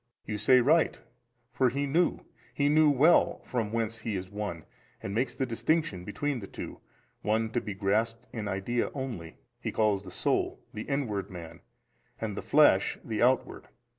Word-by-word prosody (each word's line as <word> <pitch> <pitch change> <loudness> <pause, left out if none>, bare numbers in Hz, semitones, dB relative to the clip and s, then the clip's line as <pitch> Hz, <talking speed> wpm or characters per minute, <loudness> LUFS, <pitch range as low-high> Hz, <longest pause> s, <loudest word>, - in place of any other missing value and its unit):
A. - - -5
You 105 - -2
said 125 0 +5
right: 160 +3 +4 0.6
for 130 -2 +3
he 140 +4 -1
knew, 165 +5 +1 0.3
he 145 0 +2
knew 155 0 +5
well 145 +5 +4
from 115 -4 -2
whence 115 -1 -2
he 110 -1 -3
is 95 0 -5
one, 100 -6 -4 0.4
and 95 - -4
makes 120 +5 0
the 135 - 0
distinction 120 - 0
[between 135 +7 -2
the 100 - -8
two] - - -8 0.4
one 110 +1 0
to 120 - 0
be 105 - -5
grasped 110 +4 0
in 110 -3 -4
idea 100 +5 -1
only: 115 - -5 0.2
he - - -3
calls 105 -3 +2
the 95 - -10
soul, - - 0
the 105 - -6
inward 110 -9 -1
man, 85 -4 -9 0.6
and 110 -3 -3
the - - -4
flesh, 145 -10 +4
the 110 -2 -3
outward. 125 +1 +1
115 Hz, 175 wpm, -29 LUFS, 100-135 Hz, 0.6 s, said